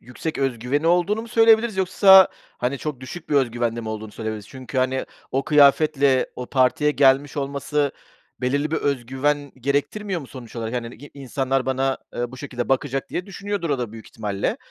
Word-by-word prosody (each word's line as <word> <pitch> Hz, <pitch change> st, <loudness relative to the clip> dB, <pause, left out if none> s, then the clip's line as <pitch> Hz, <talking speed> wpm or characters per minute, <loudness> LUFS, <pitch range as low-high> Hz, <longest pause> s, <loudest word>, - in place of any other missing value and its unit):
yüksek 125 Hz, +6 st, -6 dB
özgüveni 135 Hz, +3 st, -1 dB
olduğunu 180 Hz, +6 st, +2 dB
mu 230 Hz, -, -10 dB
söyleyebiliriz 225 Hz, -1 st, +4 dB
yoksa, 190 Hz, 0 st, +7 dB, 0.3 s
hani, 130 Hz, +2 st, -1 dB
çok 150 Hz, -5 st, -5 dB
düşük 140 Hz, +7 st, -9 dB
bir -, -, +1 dB
özgüvende 120 Hz, -3 st, +1 dB
mi 110 Hz, -, -6 dB
olduğunu 110 Hz, 0 st, -5 dB
söyleyebiliriz? 110 Hz, -2 st, -5 dB
Çünkü, 130 Hz, -2 st, -6 dB
hani, 130 Hz, +1 st, 0 dB, 0.3 s
o 135 Hz, +1 st, 0 dB
kıyafetle 140 Hz, -2 st, +4 dB
o 125 Hz, -, -5 dB
partiye 135 Hz, +3 st, +2 dB
gelmiş 140 Hz, 0 st, +3 dB
olması 140 Hz, +1 st, -1 dB, 0.5 s
belirli 140 Hz, +4 st, 0 dB
bir 160 Hz, -, 0 dB
özgüven 140 Hz, +2 st, -1 dB
gerektirmiyor 170 Hz, -, -1 dB
mu 140 Hz, -, -10 dB
sonuç 125 Hz, -3 st, -11 dB
olarak? 115 Hz, +1 st, -4 dB
Hani, 120 Hz, -1 st, -4 dB
i 145 Hz, -, -13 dB
insanlar 135 Hz, -1 st, -2 dB
bana, 135 Hz, 0 st, 0 dB, 0.2 s
eee, 120 Hz, 0 st, -3 dB
bu 130 Hz, -, -9 dB
şekilde 125 Hz, -3 st, -5 dB
bakacak 135 Hz, 0 st, -1 dB
diye 180 Hz, -, -3 dB
düşünüyordur 200 Hz, -3 st, -4 dB
o 140 Hz, -, +1 dB
da 120 Hz, -3 st, -4 dB
büyük 110 Hz, -1 st, -11 dB
ihtimalle. 105 Hz, -3 st, -3 dB
135 Hz, 175 wpm, -23 LUFS, 125-150 Hz, 0.5 s, yoksa